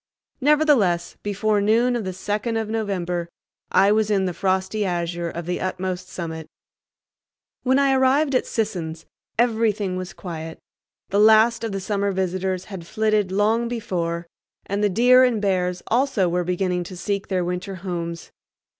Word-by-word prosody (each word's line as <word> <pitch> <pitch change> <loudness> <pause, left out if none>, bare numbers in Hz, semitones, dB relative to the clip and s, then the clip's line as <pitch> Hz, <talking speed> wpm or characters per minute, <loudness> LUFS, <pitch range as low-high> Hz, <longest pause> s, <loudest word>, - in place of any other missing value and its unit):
Nevertheless, 270 - +3
before 205 +1 0
noon 230 +4 +3
of 230 -4 -2
the 185 - -2
second 210 +5 -2
of 220 -1 -2
November 180 -6 -2 0.4
I 195 +2 +4
was 215 0 +2
in 195 -2 +2
the 180 - -2
frosty 190 +3 0
azure 175 -2 -2
of 170 0 -6
the 180 +1 -2
utmost 185 0 -3
summit. 160 -2 -6 1.1
When 260 +1 +2
I 275 -1 +3
arrived 270 +2 +3
at 255 - +1
Sisson's 175 -8 -3 0.3
everything 220 -5 +1
was 185 -1 -6
quiet. 160 -3 -7 0.5
The 200 - +1
last 220 +2 +5
of 225 - -2
the 195 - -3
summer 200 +1 -1
visitors 185 0 -2
had 185 -5 -8
flitted 215 -2 +1
long 220 +4 +2
before, 175 -7 -3 0.4
and 200 +1 -2
the 205 - +4
deer 245 +6 +6
and 245 -4 +2
bears 180 -3 0
also 240 -6 +1
were 175 +1 0
beginning 180 0 -1
to 180 +1 -9
seek 200 +1 -2
their 185 -2 0
winter 180 +2 -4
homes. 170 -2 -5
195 Hz, 155 wpm, -23 LUFS, 180-220 Hz, 1.1 s, deer